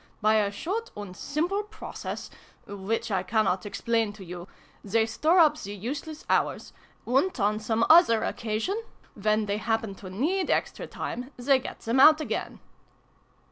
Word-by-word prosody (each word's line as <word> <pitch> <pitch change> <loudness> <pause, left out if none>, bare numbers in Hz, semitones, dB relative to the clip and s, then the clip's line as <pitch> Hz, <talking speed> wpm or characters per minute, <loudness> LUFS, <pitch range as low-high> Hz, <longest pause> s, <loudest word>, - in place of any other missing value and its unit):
By 215 0 +4
a 205 -2 +2
short 390 - -4
and 200 -3 -7
simple 335 - -1
process 425 +1 -7 0.3
which 205 +3 -3
I 190 -2 +1
cannot 195 -1 0
explain 225 0 0
to 200 -2 -11
you 175 +1 -8 0.4
they 220 +2 +2
store 310 +10 +2
up 305 -3 +5
the 200 0 -6
useless 285 - -6
hours: - - 0 0.3
and, 270 +7 +1
on 210 +1 +1
some 220 +1 +1
other 315 -10 +6
occasion, 230 - -2 0.3
when 215 +1 +1
they 200 0 -1
happen 225 -1 -1
to 190 - -8
need 320 - -1
extra - - -1
time, 250 +2 -5
they 265 +2 +3
get - - -8
them 235 +3 0
out 310 +3 +8
again." 310 - -4
225 Hz, 155 wpm, -27 LUFS, 205-305 Hz, 0.4 s, out